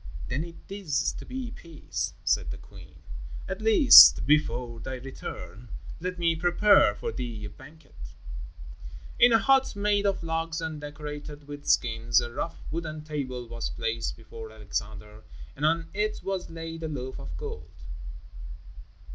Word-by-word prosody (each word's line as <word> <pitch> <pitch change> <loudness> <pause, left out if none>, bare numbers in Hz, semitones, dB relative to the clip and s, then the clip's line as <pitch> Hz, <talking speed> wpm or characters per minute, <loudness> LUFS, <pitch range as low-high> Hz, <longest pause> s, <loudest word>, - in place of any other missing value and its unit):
"Then 150 - -1
it 170 0 -10
is 185 -8 -1
to - - -10
be 255 -2 -5
peace," 80 - -5
said - - +1
the - - -5
queen. 80 -6 -15 0.4
"At 190 +2 -5
least, 225 +6 +9
before 125 -5 +1
thy 130 +3 -5
return, 125 -3 -8 0.3
let 180 +2 -4
me 170 -1 +2
prepare 175 - +4
for - - -4
thee 115 -2 -5
a 105 - -7
banquet." 130 - -14 1.0
In 245 0 +7
a 225 - +7
hut 270 +1 +3
made 205 0 +1
of 195 -3 -1
logs 165 0 -2
and 160 -2 -5
decorated 150 0 -7
with 145 0 -9
skins, 115 0 +3
a 120 -1 -4
rough 165 - -5
wooden 155 -2 -4
table 130 -5 -4
was 115 0 -4
placed 115 0 -3
before 115 0 -10
Alexander 105 0 -6 0.3
and 150 +3 +1
on 165 +1 0
it 210 +2 -1
was 195 -2 -3
laid 165 0 -7
a 160 - -3
loaf 130 -4 -5
of 75 +3 -7
gold. 75 0 -7
145 Hz, 150 wpm, -27 LUFS, 115-165 Hz, 1.0 s, least